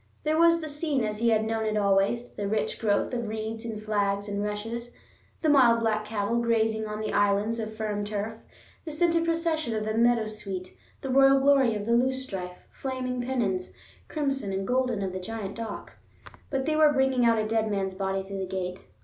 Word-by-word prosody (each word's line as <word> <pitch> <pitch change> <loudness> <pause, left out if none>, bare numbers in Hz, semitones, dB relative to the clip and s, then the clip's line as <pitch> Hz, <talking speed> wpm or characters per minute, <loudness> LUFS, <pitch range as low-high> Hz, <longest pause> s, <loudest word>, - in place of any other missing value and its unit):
There 310 0 +1
was 335 0 +5
the 315 - -4
scene 295 -3 -1
as 210 -1 -2
he 235 0 +3
had 220 -1 +3
known 225 0 -1
it 215 -1 0
always, 200 +4 +1
the 205 - -3
rich 215 +1 -1
growth 210 +2 +1
of 235 -2 -2
reeds 220 +1 -4
and 220 -2 -4
flags 205 -1 -1
and 205 0 -2
rushes, 225 +3 -4 0.5
the - - +3
mild 250 -6 +5
black 215 -1 0
cattle 215 +1 -1
grazing 220 -2 +1
on 210 0 -4
the 215 - -3
"islands" 205 +3 +2
of 220 -1 -5
firm 210 -1 -2
turf, 210 +2 -4 0.4
the - - -6
scented 335 +1 +2
procession 330 -6 0
of 215 0 -2
the 215 - -1
meadowsweet, 215 -5 0 0.3
the 270 - -3
royal 270 +1 +6
glory 270 -4 +4
of 205 -1 -4
the 230 - -1
loosestrife, 235 -8 -1
flaming 255 -2 -3
pennons, 225 -8 -1 0.3
crimson 275 -8 -2
and 190 0 -2
golden, 250 -5 +1
of 190 - -2
the 185 - -4
giant 200 0 -5
dock. 225 -1 -7 0.5
But 270 -1 -1
they 310 0 +1
were 310 -1 +6
bringing 265 -3 +2
out 230 -1 +4
a 215 - 0
dead 220 0 +1
man's 195 -2 -1
body 195 0 -2
through 195 0 -6
the 190 - -3
gate. 180 0 -4
220 Hz, 200 wpm, -27 LUFS, 205-260 Hz, 0.5 s, royal